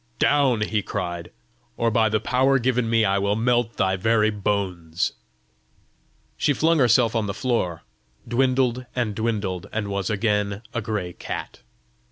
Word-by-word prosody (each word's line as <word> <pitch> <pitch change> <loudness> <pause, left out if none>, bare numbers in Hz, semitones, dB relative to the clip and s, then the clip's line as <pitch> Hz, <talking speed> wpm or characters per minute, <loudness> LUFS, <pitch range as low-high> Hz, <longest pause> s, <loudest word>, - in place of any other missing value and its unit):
"Down!" 135 -6 +3
he 105 0 0
cried; 85 -2 -4 0.5
"or 115 -1 +1
by 110 -1 +3
the 110 +1 +1
power 130 +4 +2
given 125 -2 0
me 115 -1 +3
I 100 +1 +2
will 100 +1 +1
melt 120 0 +1
thy 95 0 +1
very 110 +2 +2
bones." 95 -5 -2 1.2
She 145 - +2
flung 160 +3 +2
herself 120 -2 +4
on 110 -2 0
the 100 - -3
floor, 105 -10 -1 0.4
dwindled 125 0 +1
and 120 -4 -1
dwindled, 105 -5 -2
and 110 -2 -3
was 100 0 -2
again 105 -1 0
a 120 - -1
gray 105 -4 -3
cat. - - -6
110 Hz, 150 wpm, -24 LUFS, 100-120 Hz, 1.2 s, herself